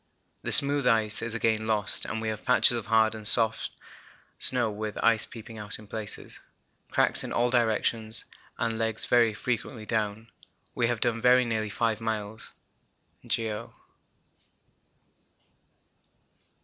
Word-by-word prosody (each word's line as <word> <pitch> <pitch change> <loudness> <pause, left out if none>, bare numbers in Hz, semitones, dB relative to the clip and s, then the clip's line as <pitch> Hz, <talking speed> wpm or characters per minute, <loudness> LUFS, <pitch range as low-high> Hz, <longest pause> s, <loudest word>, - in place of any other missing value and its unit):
The - - -4
smooth 140 -2 +6
ice 110 -3 +2
is 115 -1 -2
again 110 -1 0
lost 105 -3 0
and 110 - -4
we 110 0 -3
have 110 -1 -5
patches 125 -1 +4
of 115 -3 -3
hard 110 0 +3
and 110 -1 -4
soft 110 0 +2 0.7
snow 120 -4 +3
with 105 0 -5
ice 115 -2 +3
peeping 115 -1 -11
out 105 +1 -5
in 110 - -14
places, 110 0 -7 0.5
cracks - - +2
in - - -6
all 120 +1 +1
directions, 110 -1 -1 0.3
and 115 -1 -2
legs 110 -1 -2
very 115 -3 +3
frequently 115 -1 -4
down. 110 0 -3 0.4
We 120 - +1
have 120 -2 -2
done 115 -1 0
very 125 +1 +5
nearly 110 -2 -2
5 115 0 -1
miles 110 -1 -4 0.8
(geo.). 110 -2 -3
110 Hz, 135 wpm, -27 LUFS, 110-115 Hz, 0.8 s, smooth